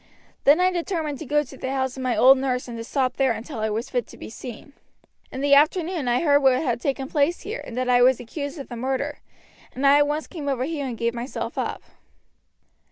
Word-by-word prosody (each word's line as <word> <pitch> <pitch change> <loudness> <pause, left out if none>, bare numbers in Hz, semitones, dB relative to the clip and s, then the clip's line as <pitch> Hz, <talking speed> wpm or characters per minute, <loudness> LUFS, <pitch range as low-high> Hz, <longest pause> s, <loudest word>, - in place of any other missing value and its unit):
Then 290 +4 +6
I 365 0 +3
determined 330 -5 -3
to 315 - -7
go 295 +2 +2
to 270 -1 -13
the 260 - -5
house 265 -1 -1
of 265 - -7
my 255 -2 0
old 265 +1 +7
nurse 255 -2 -1
and 240 - -7
to 230 - -5
stop 255 +1 -1
there 265 -3 +3
until 235 +2 -7
I 220 0 0
was 220 +3 -3
fit 245 -2 -1
to - - -14
be - - -9
seen. 245 +4 -9 0.6
In 265 - -5
the 285 0 +3
afternoon 315 +1 +3
I 240 +1 +2
heard 285 -3 +5
what 265 -1 +5
had 240 -6 -1
taken 270 -1 -2
place 295 +4 +1
here, 435 +4 -5
and 240 - -8
that 255 0 -1
I 245 -1 +4
was 255 0 +5
accused 285 +5 -6
of 275 - -7
the 240 - -6
murder, 265 +4 -2 0.6
and 265 +3 -2
I 280 +1 +7
at 290 - +3
once 300 +2 -2
came 295 -5 -5
over 260 -2 -1
here 290 -1 -3
and 240 -3 -5
gave 235 +1 0
myself 240 +3 -5
up." - - -3
270 Hz, 240 wpm, -24 LUFS, 250-295 Hz, 0.6 s, old